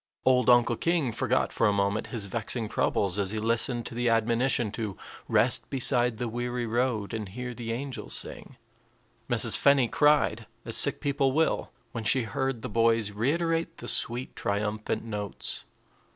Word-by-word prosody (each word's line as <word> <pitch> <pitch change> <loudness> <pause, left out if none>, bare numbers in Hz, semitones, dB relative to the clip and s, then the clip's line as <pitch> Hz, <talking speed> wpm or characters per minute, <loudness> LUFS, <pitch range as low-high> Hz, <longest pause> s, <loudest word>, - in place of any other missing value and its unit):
Old 125 -2 +4
Uncle 120 -1 +4
King 165 -7 0
forgot 125 +2 0
for - - +2
a - - +3
moment 100 +1 0
his 115 -5 -3
vexing 110 +3 -3
troubles 100 -2 0
as 100 -2 0
he 110 - -1
listened 115 +2 0
to - - -6
the 120 +1 0
admonition 115 0 +2
to 105 -5 -5 0.3
"rest 115 +1 +2
beside 125 -3 +2
the 120 +1 -2
weary 120 +1 -3
road 115 -2 -1
and 110 -3 -4
hear 125 +5 -6
the 115 -1 -5
angels 130 +2 -5
sing." - - -6 0.7
Mrs. - - +2
Fenny 140 -3 +4
cried, 150 +4 +2 0.2
as - - -1
sick - - +4
people 135 -2 +1
will, 160 +2 +1 0.2
when 115 -1 -5
she 120 +3 +2
heard 125 +2 -3
the - - -2
boys 115 -1 +2
reiterate 165 +9 -1
the - - -8
sweet, 120 +2 -2
triumphant 105 +1 -2
notes. 105 -3 -4
120 Hz, 165 wpm, -27 LUFS, 110-130 Hz, 0.7 s, Old